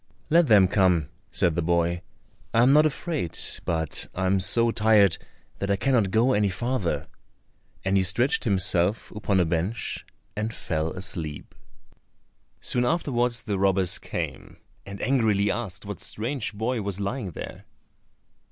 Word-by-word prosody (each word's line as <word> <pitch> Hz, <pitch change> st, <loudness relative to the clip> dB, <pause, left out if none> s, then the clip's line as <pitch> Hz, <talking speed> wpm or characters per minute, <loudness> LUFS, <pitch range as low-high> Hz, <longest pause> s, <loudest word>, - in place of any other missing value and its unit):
"Let 170 Hz, 0 st, +5 dB
them 105 Hz, -5 st, +6 dB
come," 90 Hz, -6 st, +2 dB, 0.2 s
said 90 Hz, -4 st, +2 dB
the 85 Hz, -, -1 dB
boy, 85 Hz, +1 st, 0 dB, 0.5 s
"I 115 Hz, -, +5 dB
am 130 Hz, +3 st, +5 dB
not 155 Hz, +1 st, +6 dB
afraid; 155 Hz, -, -3 dB, 0.3 s
but 80 Hz, -2 st, -1 dB
I 95 Hz, -, -1 dB
am 95 Hz, +1 st, +2 dB
so 115 Hz, +5 st, +3 dB
tired 105 Hz, -5 st, +3 dB, 0.4 s
that 100 Hz, -, -3 dB
I 100 Hz, -, +3 dB
cannot 115 Hz, -2 st, +1 dB
go 115 Hz, +6 st, +2 dB
any 105 Hz, -2 st, +2 dB
farther:" 120 Hz, -1 st, -2 dB, 0.8 s
and 95 Hz, 0 st, +2 dB
he -, -, +3 dB
stretched 100 Hz, +9 st, +1 dB
himself 95 Hz, -1 st, +2 dB
upon 105 Hz, -2 st, 0 dB
a 90 Hz, -, +3 dB
bench 85 Hz, +7 st, -3 dB, 0.3 s
and 105 Hz, +2 st, -2 dB
fell 80 Hz, -1 st, -2 dB
asleep. 85 Hz, -5 st, -4 dB, 1.1 s
Soon 125 Hz, -, 0 dB
afterwards 120 Hz, -5 st, 0 dB
the 100 Hz, -4 st, -2 dB
robbers 95 Hz, -2 st, +2 dB
came, -, -, -6 dB, 0.3 s
and 100 Hz, 0 st, -8 dB
angrily 110 Hz, -6 st, +2 dB
asked 110 Hz, -7 st, -4 dB
what -, -, -7 dB
strange 120 Hz, +2 st, -2 dB
boy 115 Hz, +3 st, -2 dB
was 100 Hz, -1 st, -2 dB
lying 100 Hz, +1 st, -3 dB
there? 85 Hz, -, -9 dB
100 Hz, 145 wpm, -25 LUFS, 90-120 Hz, 1.1 s, them